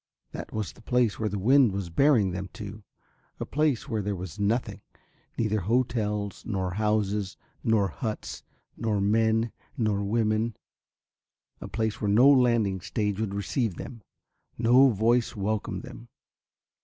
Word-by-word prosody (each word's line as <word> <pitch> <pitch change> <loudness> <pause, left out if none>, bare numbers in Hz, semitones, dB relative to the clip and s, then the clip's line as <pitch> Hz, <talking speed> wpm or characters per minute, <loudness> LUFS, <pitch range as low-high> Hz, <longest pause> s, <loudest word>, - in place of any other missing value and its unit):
That - - -7
was 110 -4 -3
the - - -18
place 120 -3 +1
where 110 -1 0
the 100 - -3
wind 125 +4 +5
was 95 -3 -4
bearing 115 - +4
them 95 +1 -5
to, 105 0 -8 0.6
a - - -3
place 150 -4 0
where 110 -3 -1
there 100 0 -2
was 95 +2 -7
nothing. 110 +5 -1 0.6
Neither 110 -2 +1
hotels 105 -2 -1
nor 95 -4 -2
houses 105 -1 0 0.3
nor 110 -4 +2
huts, 110 -5 -5 0.3
nor 110 -3 -1
men 110 +2 +2 0.3
nor 105 -4 0
women, 110 +1 0 1.0
a - - -7
place 110 -1 -2
where 105 - 0
no 115 +7 +6
landing 120 -8 +3
stage 105 0 -2
would 105 -3 -2
receive 100 0 -1
them, 115 +4 -8 0.6
no 125 +4 +6
voice 115 +2 +1
welcome 105 +1 -2
them. - - -11
110 Hz, 145 wpm, -27 LUFS, 100-115 Hz, 1.0 s, no